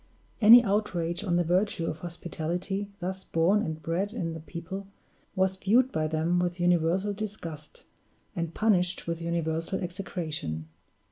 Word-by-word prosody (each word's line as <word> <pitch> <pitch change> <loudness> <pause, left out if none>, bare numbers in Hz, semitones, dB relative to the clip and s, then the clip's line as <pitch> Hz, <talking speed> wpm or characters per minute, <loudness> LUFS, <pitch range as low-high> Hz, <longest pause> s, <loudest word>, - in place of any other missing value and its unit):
Any 235 +3 +10
outrage 195 -4 -1
on 180 -4 +1
the 175 - +3
virtue 180 +1 +1
of 155 - -3
hospitality, 175 +3 -4
thus 190 +1 -4
born 175 +6 +2
and 160 -5 -3
bred 175 +7 -2
in 170 -8 -3
the 160 - -6
people, 180 +5 -7 0.5
was 190 0 +1
viewed 240 +7 +3
by 155 0 0
them 160 +3 +1
with 175 0 -1
universal 175 +3 +2
disgust, 195 -8 -7 0.5
and 170 -2 -2
punished 185 -3 +1
with 170 0 -3
universal 165 +1 -1
execration. 165 - -4
175 Hz, 140 wpm, -28 LUFS, 165-195 Hz, 0.5 s, Any